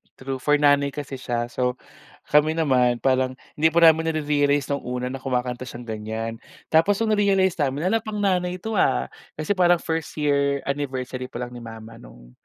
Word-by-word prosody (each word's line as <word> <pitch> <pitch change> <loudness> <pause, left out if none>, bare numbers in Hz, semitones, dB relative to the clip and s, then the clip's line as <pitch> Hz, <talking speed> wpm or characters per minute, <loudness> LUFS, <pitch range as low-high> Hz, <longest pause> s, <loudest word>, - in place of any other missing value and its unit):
true, 135 0 -5
for 150 +3 +3
nanay 145 -1 +3
kasi 145 -2 -5
siya. 120 -2 -2
So, 125 0 -1 0.6
kami 150 +1 +5
naman 125 -6 +2
parang 130 -1 +2 0.2
hindi 155 +2 +3
pa 170 +2 +3
namin 160 0 +5
nare-realize 145 -2 +1
'nong 140 - -2
una 125 0 -3
na 135 - -5
kumakanta 125 -1 -3
siyang 120 0 -8
ganyan, 110 +1 -4 0.4
tapos 165 +6 +4
'nong 220 -1 +2
na-realize 195 -3 +2
namin 145 +3 0
"Hala 225 - +3
pang 215 -2 -5
nanay 180 -2 +1
'to 210 +2 -3
ha?" 60 0 +1 0.2
Kasi 155 +4 -3
parang 175 -2 +4
1st 160 -1 -3
year 140 -2 +1
anniversary 130 -2 -3
pa 125 -1 -6
lang 120 - -7
ni 120 - -9
mama 115 -1 -10
'nong - - -15
140 Hz, 185 wpm, -23 LUFS, 125-160 Hz, 0.6 s, kami